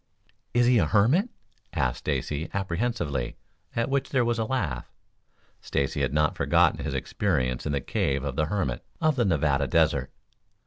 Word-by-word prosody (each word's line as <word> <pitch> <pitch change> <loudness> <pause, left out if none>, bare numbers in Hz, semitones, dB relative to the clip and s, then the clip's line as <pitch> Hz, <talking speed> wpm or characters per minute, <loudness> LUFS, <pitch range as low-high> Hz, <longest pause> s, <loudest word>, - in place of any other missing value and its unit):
"Is 120 0 +5
he 120 -1 +5
a 80 - +2
hermit?" 130 - +3 0.4
asked 60 -2 0
Stacy 75 +2 -2
apprehensively, 85 - -2 0.4
at 115 - +1
which 135 0 0
there 130 -3 +2
was 120 -1 0
a 110 - +1
laugh. 95 - -2 0.7
Stacy 70 - -1
had - - +1
not 75 +1 +2
forgotten - - +3
his - - -3
experiences 65 -10 -1
in 75 - -1
the 70 - 0
cave 70 +1 -1
of 70 -3 -3
the 75 - +1
hermit 80 -10 -2 0.2
of 155 -2 +2
the 120 -3 +2
Nevada 75 -6 +2
Desert. 75 -2 +2
80 Hz, 165 wpm, -27 LUFS, -, 0.7 s, Is